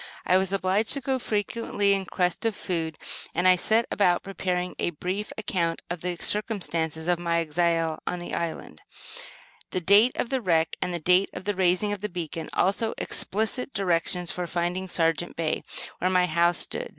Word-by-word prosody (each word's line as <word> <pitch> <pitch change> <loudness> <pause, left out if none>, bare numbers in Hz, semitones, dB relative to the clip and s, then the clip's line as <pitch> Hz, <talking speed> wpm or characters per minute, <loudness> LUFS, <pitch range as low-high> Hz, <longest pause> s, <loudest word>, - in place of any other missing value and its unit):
I 180 - +4
was 190 0 +1
obliged 195 +3 +1
to 280 - +1
go 265 -1 -1
frequently 205 -2 0
in 195 -1 -1
quest 180 -2 0
of 225 -2 0
food, 165 -5 -3 0.4
and 175 +2 +3
I 185 - +8
set 220 +6 +2
about 180 -4 +3
preparing 180 -2 -2
a - - +1
brief 185 +6 -4
account 180 -6 -1
of 175 -2 -4
the 180 0 -2
circumstances 170 -6 -2
of 175 -1 +2
my 170 -1 0
exile 165 0 +1
in 180 - -1
the 175 - -6
island, 170 -1 -4 0.9
the 185 - -1
date 200 +8 +5
of 235 - -1
the 265 -2 0
wreck 165 -5 +2
and 180 - -1
the 175 - -1
date 180 +4 +3
of 185 - -7
the 205 +2 0
raising 185 +2 +2
of 205 -2 -3
the 210 - -2
beacon; 165 -3 -5
also, 200 +4 +1
explicit 220 +6 -1
directions 180 -2 +1
for 180 -1 -3
finding 175 +2 -2
"Sargent" 165 -1 0
Bay, 160 -2 -1 0.4
where 185 - +1
my 180 -1 +4
house 170 +1 +2
stood. - - -4
180 Hz, 185 wpm, -26 LUFS, 170-205 Hz, 0.9 s, I